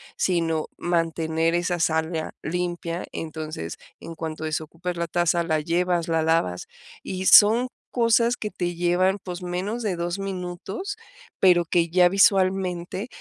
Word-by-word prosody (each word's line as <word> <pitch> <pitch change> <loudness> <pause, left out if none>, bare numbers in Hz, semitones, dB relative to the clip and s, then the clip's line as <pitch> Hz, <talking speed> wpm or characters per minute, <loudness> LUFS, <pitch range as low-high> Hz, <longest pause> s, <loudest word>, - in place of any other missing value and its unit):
sino, 165 -3 0
mantener 165 -1 0
esa 175 0 0 0.2
área 160 0 -3
limpia, 175 0 -3
entonces, 155 - -6 0.2
en 165 - -8
cuanto 160 -1 -6
desocupes 160 +3 -4
la 170 0 -2
taza, 175 0 +1
la 160 -2 0
llevas, 170 +2 0
la 165 -1 +1
lavas, 160 - 0 0.3
y 190 0 -5
son 225 +6 +7 0.2
cosas 235 0 +3
que 210 - -5
te 175 -1 -3
llevan, 180 +3 +2
pues, 180 -1 -6
menos 185 +6 -3
de 205 -5 -1
2 175 +2 -3
minutos, 195 - -5 0.4
pero 175 -2 +5
que 170 0 +1
ya 180 +1 +5
visualmente 190 0 +2
175 Hz, 135 wpm, -24 LUFS, 165-185 Hz, 0.4 s, son